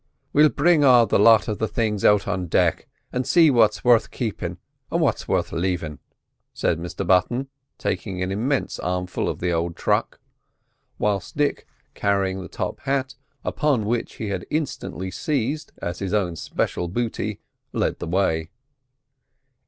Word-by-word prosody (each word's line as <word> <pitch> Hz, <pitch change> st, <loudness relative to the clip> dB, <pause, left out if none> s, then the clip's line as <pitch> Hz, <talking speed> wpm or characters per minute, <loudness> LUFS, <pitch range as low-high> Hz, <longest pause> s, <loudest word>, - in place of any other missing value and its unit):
"We'll 150 Hz, +1 st, +6 dB
bring 155 Hz, +1 st, +3 dB
all 125 Hz, -4 st, +7 dB
the -, -, +2 dB
lot 110 Hz, +1 st, +6 dB
of 105 Hz, -, -3 dB
the 110 Hz, -, 0 dB
things 105 Hz, -3 st, -1 dB
out 105 Hz, -1 st, +4 dB
on 90 Hz, -1 st, -2 dB
deck, -, -, +1 dB, 0.3 s
and 125 Hz, -, 0 dB
see 165 Hz, +2 st, +5 dB
what's 110 Hz, -4 st, +3 dB
worth 120 Hz, -2 st, +4 dB
keepin' 115 Hz, -5 st, -4 dB, 0.3 s
an' -, -, +1 dB
what's -, -, 0 dB
worth -, -, 0 dB
leavin'," 85 Hz, -4 st, -2 dB, 0.6 s
said 80 Hz, -, 0 dB
Mr 85 Hz, +3 st, -4 dB
Button, 120 Hz, +10 st, +2 dB, 0.3 s
taking 95 Hz, -4 st, -3 dB
an 90 Hz, -, -2 dB
immense 125 Hz, +7 st, -1 dB
armful 90 Hz, 0 st, -2 dB
of -, -, -3 dB
the 90 Hz, 0 st, 0 dB
old 85 Hz, 0 st, -1 dB
truck; -, -, 0 dB, 0.8 s
whilst 100 Hz, 0 st, -1 dB
Dick, 145 Hz, -1 st, 0 dB, 0.3 s
carrying 95 Hz, -1 st, 0 dB
the 90 Hz, -, -7 dB
top -, -, -4 dB
hat, 135 Hz, -1 st, -1 dB, 0.3 s
upon 140 Hz, -8 st, +1 dB
which 115 Hz, +2 st, -2 dB
he 110 Hz, -, -4 dB
had 95 Hz, -3 st, -4 dB
instantly 130 Hz, -, -3 dB
seized 140 Hz, -, -2 dB
as 85 Hz, 0 st, -3 dB
his 100 Hz, +1 st, -1 dB
own 90 Hz, -5 st, 0 dB
special 85 Hz, +2 st, -2 dB
booty, 110 Hz, +1 st, -3 dB, 0.3 s
led -, -, -1 dB
the -, -, -5 dB
way. 80 Hz, -3 st, 0 dB
105 Hz, 155 wpm, -23 LUFS, 90-125 Hz, 0.8 s, all